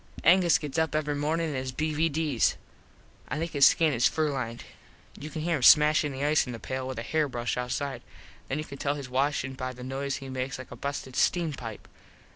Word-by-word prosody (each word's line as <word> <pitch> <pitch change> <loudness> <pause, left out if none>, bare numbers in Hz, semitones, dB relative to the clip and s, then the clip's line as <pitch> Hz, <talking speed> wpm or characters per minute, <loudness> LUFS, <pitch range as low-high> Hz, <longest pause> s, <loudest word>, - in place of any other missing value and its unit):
Angus 175 -1 +5
gets 150 +1 -3
up 160 -1 0
every 150 -1 0
mornin 155 +3 -1
in 145 - -4
his 130 0 -3
BVDs. 155 -2 +1 0.7
I - - -3
think 165 +2 -3
his 140 -3 +7
skin 160 -3 +3
is 120 -1 +4
furlined. 135 -7 -2 0.5
You 150 - -8
can 155 -1 -5
hear 170 -1 +1
him - - -6
smashin 150 +2 +6
the 135 +1 -3
ice 150 -2 +3
in 125 - -5
the 115 - -7
pale 130 +4 -4
with 130 - -5
a 115 - -3
hair 155 +4 0
brush 120 -1 -2
outside. 125 +3 -3 0.5
Then 135 - -2
you 155 - -2
can 140 -2 -10
tell 140 0 0
hes 140 -3 -7
washin 135 0 0
by 130 -1 -5
the 125 0 -10
noise 135 +2 -3
he 135 - -7
makes 130 0 -4
like 130 - -10
a - - -7
busted 135 0 -5
steam 170 -4 +1
pipe. 115 -5 -8
140 Hz, 220 wpm, -28 LUFS, 130-155 Hz, 0.7 s, his